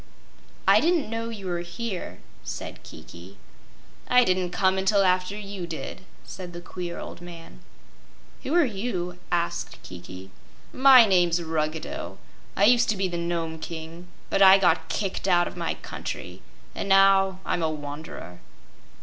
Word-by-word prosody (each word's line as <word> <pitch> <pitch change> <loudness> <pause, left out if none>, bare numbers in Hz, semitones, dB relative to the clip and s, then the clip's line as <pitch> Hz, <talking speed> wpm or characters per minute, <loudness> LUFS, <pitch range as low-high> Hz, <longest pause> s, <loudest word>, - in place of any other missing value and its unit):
"I - - +7
didn't 325 -8 +1
know 230 0 -3
you 210 -4 -8
were 175 -2 -2
here," 180 +3 -6 0.2
said - - -7
Kiki. 90 +4 -13 0.7
"I 250 0 +5
didn't 185 -3 +1
come 190 +1 +1
until 195 +1 +3
after 185 +2 +1
you 200 -4 -6
did," 165 +2 -6 0.2
said 180 -2 -9
the 175 - -7
queer 175 0 -6
old - - -8
man. 170 - -11 0.8
"Who 285 - -2
are 345 -3 +5
you?" 195 -6 -4
asked 170 -1 -2
Kiki. 90 +1 -10 0.4
"My 260 -2 +8
name's 175 -4 +3
Ruggedo. 160 -1 -3 0.4
I 195 - +1
used 235 +3 +5
to 215 - +1
be 190 0 0
the 175 - -3
Nome 165 -1 -3
King; 165 +2 -8 0.2
but 195 - +1
I 190 0 +9
got 175 -4 +2
kicked 195 -1 -2
out 175 -2 +3
of - - -8
my - - -2
country, - - -7 0.3
and 200 - -4
now 195 -1 +5
I'm 175 - -1
a 160 - +1
wanderer." 145 - -8
180 Hz, 150 wpm, -25 LUFS, 165-195 Hz, 0.8 s, I